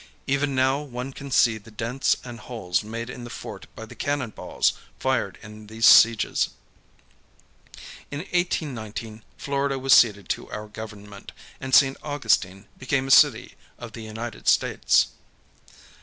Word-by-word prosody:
Even 140 0 0
now 130 +2 +2
one 130 -1 -6
can 140 +1 -9
see 115 -4 +3
the 105 - -16
dents 115 +5 -1
and 120 -1 -9
holes 110 -6 -2
made 115 +2 -6
in 125 0 -8
the 120 - -8
fort - - -9
by - - -8
the - - -12
cannon 145 -5 -2
balls - - 0 0.2
fired 130 -7 -1
in 105 0 -12
these 110 +1 -1
sieges. 115 -3 +6 1.6
In 145 +1 -5
1819 120 - -3
Florida 140 -1 -1
was 135 0 +3
ceded 100 -5 +5
to - - -3
our 105 0 -6
Government, 105 -2 -10 0.3
and 130 0 +1
St. 135 -1 +5
Augustine 105 -9 0
became 130 +1 -1
a - - -1
city - - +5 0.2
of 120 -1 -9
the 115 - -9
United 110 +1 -7
States. - - +3
120 Hz, 145 wpm, -24 LUFS, 110-135 Hz, 1.6 s, sieges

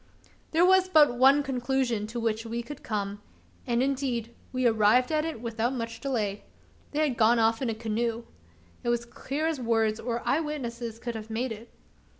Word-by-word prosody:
There 330 +2 +4
was 375 0 +5
but 300 -8 +5
one 270 +3 +5
conclusion 250 -4 -1
to 235 +2 -5
which 225 -1 -1
we 235 +1 -4
could 290 +3 -9
come; 205 -1 -3 0.5
and 240 0 +2
indeed 255 -4 -1 0.2
we 255 -1 -1
arrived 225 +3 +4
at 310 0 +1
it 320 -9 -5
without 230 +2 -1
much 230 -2 -4
delay: 215 -7 -2 0.5
they 305 +1 +1
had 250 -4 -3
gone 230 +2 +5
off 225 +1 +2
in 255 - 0
a 225 - -2
canoe. 230 +1 -2 0.6
It - - -1
was 240 0 0
clear 280 +5 -4
as 320 -3 0
words 225 -2 +1
or 235 -1 -3
eye 285 - +3
witnesses 240 -7 -4
could 235 0 -5
have 220 -1 -7
made 235 +3 -2
it. 225 +2 -8
235 Hz, 185 wpm, -28 LUFS, 225-270 Hz, 0.6 s, was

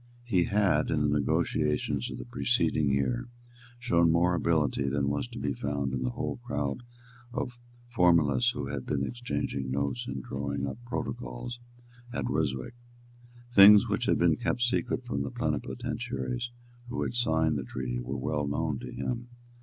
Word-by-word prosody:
He 95 -8 +2
had, 100 -7 +2
in 75 - +1
the 75 0 +2
negotiations 70 -1 0
of - - -6
the - - -7
preceding 70 +4 +1
year, 65 -3 0 0.5
shown 85 -9 +3
more 85 +2 +3
ability 80 -5 +1
than 70 0 0
was 70 +11 -1
to 120 0 -10
be 70 -7 -1
found 70 -1 -2
in 65 - -1
the 65 - 0
whole 70 +3 -3
crowd 70 - -3 0.5
of 120 0 -4 0.3
formalists 90 - +4
who 75 - -3
had 70 -1 -5
been 70 -2 0
exchanging 120 - -3
notes 70 -2 -1
and 65 -1 -4
drawing 70 +1 -3
up 70 - -5
protocols 120 - -4 0.5
at 120 - -2
Ryswick. 70 - -1 0.8
Things 100 -1 +9
which - - -1
had - - +3
been - - +3
kept 120 - 0
secret 95 -8 0
from 70 - -2
the 70 - -2
plenipotentiaries 65 - -3 0.4
who 120 - -2
had - - -2
signed 80 -10 +2
the - - -4
treaty - - -4
were 65 +3 -4
well 75 +2 -1
known 75 -1 -1
to - - -7
him. 120 0 -3
75 Hz, 160 wpm, -29 LUFS, 70-90 Hz, 0.8 s, Things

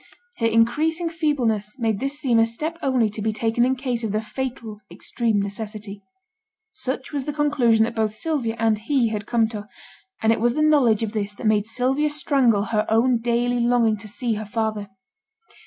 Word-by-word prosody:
Her 230 - +1
increasing 305 +10 +1
feebleness 255 -10 -1
made 225 -5 0
this 275 +3 -3
seem 240 -4 +2
a 225 - +5
step 310 +9 -4
only 255 -4 +2
to 210 - -6
be 220 +1 0
taken 225 +2 0
in 260 +1 +2
case 250 -2 -3
of 220 - -2
the 215 - +1
fatal 225 -1 -5
extreme 215 +4 -1
necessity; 205 0 -5 0.7
such 260 +2 -4
was 280 -3 -2
the 295 - -3
conclusion 270 -7 +3
that 230 +1 -1
both 220 -2 0
Sylvia 240 -2 -2
and 225 -2 +1
he 240 0 +1
had 210 0 -4
come 230 -2 +2
to; 210 -2 -7 0.6
and 220 - +4
it 230 - -2
was 240 +1 +2
the 305 - +1
knowledge 255 -8 +4
of 215 -1 -3
this 205 -1 -3
that 235 - -8
made 215 -1 +2
Sylvia 260 +6 0
strangle 270 -8 +3
her 215 -1 -1
own 235 +2 +3
daily 240 +1 0
longing 235 -2 +3
to 210 +1 -10
see 230 +3 -1
her 215 0 -4
father. 215 -1 -3
230 Hz, 190 wpm, -23 LUFS, 215-260 Hz, 0.7 s, a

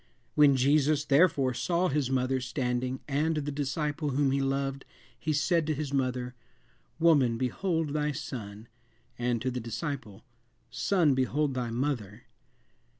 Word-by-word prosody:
When 145 -2 +6
Jesus, 145 +3 +3
therefore, 140 -3 +3
saw 175 +7 0
his 140 -4 0
mother 130 0 0
standing, 125 +1 -2
and 155 +3 0
the 145 -1 -2
disciple 145 +1 -2
whom 140 0 +1
he 140 0 +1
loved, 135 0 -1 0.4
he 155 +7 -1
said 155 +2 +1
to 155 - 0
his 140 -1 -4
mother, 125 -2 -1 0.6
Woman, 145 -8 +4
behold 160 +6 -1
thy 150 0 0
son, 115 -6 -7 0.5
and 120 -1 0
to 130 - 0
the 125 - -3
disciple, 115 -2 -5 0.5
Son, 175 -8 +2
behold 135 +2 0
thy 125 -2 -2
mother." 120 -4 -3
135 Hz, 140 wpm, -29 LUFS, 125-150 Hz, 0.6 s, When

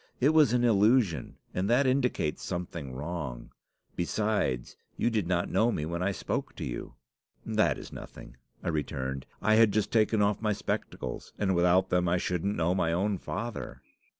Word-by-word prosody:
It 135 - +4
was 155 -6 +5
an 125 0 +2
illusion, 105 - +3 0.2
and 95 +3 -1
that 125 +4 +4
indicates 125 - 0
something 85 -5 -4
wrong. 70 -3 -5 0.4
Besides, 90 - -1 0.2
you 120 - +1
did 105 -6 0
not 90 -1 0
know 110 +6 +3
me 75 - -2
when 85 +2 -3
I 95 +2 +1
spoke - - -3
to - - -5
you.' - - -6 0.5
"'That - - +2
is - - -10
nothing," - - -10 0.3
I - - -1
returned. 65 -4 -3 0.2
'I 110 - +4
had 110 -1 +6
just 105 0 0
taken 110 -1 +3
off 105 0 +2
my 105 -1 +1
spectacles, - - -4
and 95 -2 +1
without 90 +2 +3
them 90 -1 +2
I 90 - +3
shouldn't 90 +3 -1
know 85 +1 +2
my 85 -3 +1
own 95 +3 0
father. 115 +2 -5
95 Hz, 175 wpm, -29 LUFS, 85-110 Hz, 0.5 s, had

